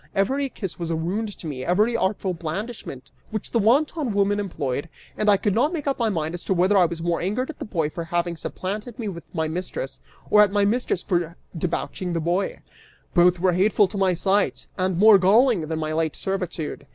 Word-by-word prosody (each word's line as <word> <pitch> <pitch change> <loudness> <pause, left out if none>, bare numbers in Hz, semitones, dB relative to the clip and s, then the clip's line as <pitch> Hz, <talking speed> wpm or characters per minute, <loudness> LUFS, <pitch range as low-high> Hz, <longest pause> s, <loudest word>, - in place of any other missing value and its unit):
Every 265 +8 +1
kiss 195 -8 -6
was 170 -1 -3
a 165 - 0
wound 200 +6 -3
to - - -11
me, 135 -5 -4
every 210 +7 +2
artful 190 -3 0
blandishment 165 - -6 0.2
which 215 -2 -5
the 230 - +2
wanton 270 +3 +2
woman 205 0 +2
employed, 150 -7 -3 0.3
and 210 - +1
I 200 - +6
could 205 0 0
not 275 - +2
make 310 -4 -3
up 275 -2 -1
my 230 -2 +2
mind 160 -4 -2
as 175 - -5
to 190 - +1
whether 185 +4 +3
I 185 -2 +6
was 165 -1 -4
more 170 -1 0
angered 240 - -1
at 300 - -19
the - - -4
boy 165 -7 -1
for 170 +1 -5
having 175 +1 -1
supplanted 210 +8 -5
me 220 -4 -3
with 170 -3 -8
my 160 -3 -1
mistress, 185 - -5 0.3
or 210 - +7
at 210 - +5
my 205 0 +2
mistress 215 -4 0
for 175 -3 -1 0.2
debauching 175 +2 -3
the 165 - 0
boy: 175 +4 -1 0.5
both 175 0 +4
were 180 0 +3
hateful 200 +3 +4
to - - -8
my 185 -2 +3
sight, 195 +3 +1
and 185 -2 0
more 210 +1 +7
galling 205 - +4
than 160 0 -2
my 155 0 -2
late 160 -1 0
servitude. 180 -7 -4
190 Hz, 215 wpm, -24 LUFS, 170-210 Hz, 0.5 s, or